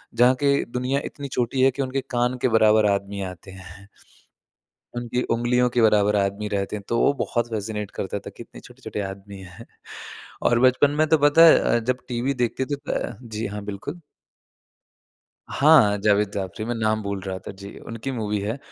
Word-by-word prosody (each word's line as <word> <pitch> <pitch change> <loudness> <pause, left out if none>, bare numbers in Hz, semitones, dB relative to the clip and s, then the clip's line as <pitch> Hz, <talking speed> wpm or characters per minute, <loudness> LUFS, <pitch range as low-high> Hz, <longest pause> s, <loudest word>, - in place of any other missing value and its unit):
जहाँ 125 +2 +5
के 140 0 +3
दुनिया 130 +3 -1
इतनी 140 -1 -7
छोटी 125 +2 0
है 135 - +5
कि 140 +2 -4
उनके 135 +1 -2
कान 125 0 0
के - - +3
बराबर 110 -1 +4
आदमी 100 0 -3
आते 90 +2 -13
हैं। 95 +1 -13 1.1
उनकी 120 +1 -2
उँगलियों 125 +1 +1
के 120 -1 +1
बराबर 105 -1 +3
आदमी 100 +1 -1
रहते 100 0 -2
हैं। 105 - -8
तो 115 - 0
वो 140 - +4
बहुत 120 -1 -2
फ़ैसिनेट 105 -1 -4
करता 100 +1 -4
था - - -5
कितने - - -12
छोटे-छोटे - - -8
आदमी 100 0 -7
हैं 95 +5 -12 0.8
और 120 0 +3
बचपन 130 +3 +4
में 155 - +4
तो 160 - +4
पता 145 +3 +6
है 165 - +7
अ, - - +2
जब 125 +2 -2
टीवी 125 +3 -1
देखते 120 +3 -2
थे 145 - -2 0.2
अ, 120 - -3
जी 110 -2 -5
हाँ, 105 0 -6
बिल्कुल। 105 - -7 1.5
हाँ, 135 -8 +5
जावेद 105 -1 +2
जाफ़री, 95 +1 -4
मैं 120 +1 -3
नाम 110 -1 0
भूल 100 -1 -4
रहा 95 0 -5
था। - - -4
जी। 100 +1 -11
उनकी 115 +4 -6
मूवी 105 -3 -2
है। 110 +6 -3
110 Hz, 185 wpm, -23 LUFS, 100-125 Hz, 1.5 s, है